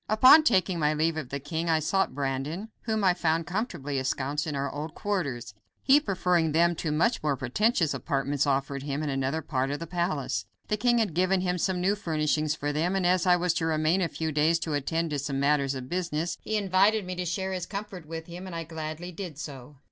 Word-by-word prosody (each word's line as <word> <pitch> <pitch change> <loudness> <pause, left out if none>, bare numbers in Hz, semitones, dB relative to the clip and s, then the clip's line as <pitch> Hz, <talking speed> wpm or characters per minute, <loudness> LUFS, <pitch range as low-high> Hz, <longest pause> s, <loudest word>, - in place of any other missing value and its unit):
Upon 255 +8 +8
taking 185 - +2
my 150 0 +2
leave 160 +1 +1
of 155 -5 -5
the 140 - -3
king 160 +4 -3
I 160 - +4
sought 155 -1 0
Brandon, 140 +9 -3 0.2
whom 220 -2 0
I 185 -2 +5
found 165 -2 0
comfortably 175 - -3
ensconced 140 +4 -2
in 150 - -3
our 140 0 -1
old 150 +2 -5
quarters, 140 - -3 0.3
he 280 +2 +6
preferring 180 - +1
them 170 +2 +4
to 155 - -2
much 225 +11 +1
more 145 -3 0
pretentious 165 - +1
apartments 140 -1 -1
offered 140 0 0
him 140 +2 -3
in 150 - -2
another 135 +4 -1
part 130 -2 -1
of 145 - -2
the 165 - -6
palace. 155 - -2 0.2
The 210 - +2
king 240 +3 +3
had 220 -7 +1
given 185 +2 +2
him 180 -1 -1
some 185 +1 0
new 190 +3 +2
furnishings 155 -5 0
for 145 -1 -2
them, 170 +5 0
and 190 -2 0
as 180 0 +2
I 180 - +6
was 175 -1 +1
to 165 -1 -1
remain 160 +3 +2
a 175 - +2
few 160 -1 -3
days 155 +3 +3
to 160 - -2
attend 160 +3 -1
to 145 - -1
some 140 0 -2
matters 140 -1 +2
of 130 -1 -6
business, 170 0 -2
he 215 - -1
invited 200 +1 +3
me 185 - -4
to 180 0 -3
share 190 +3 -2
his 180 -2 -4
comfort 195 -5 -6
with 165 0 -6
him, 180 +2 -8
and 180 - -7
I 165 - -3
gladly 160 +2 -6
did 175 -4 -7
so. 145 -2 -8
165 Hz, 225 wpm, -27 LUFS, 145-185 Hz, 0.3 s, Upon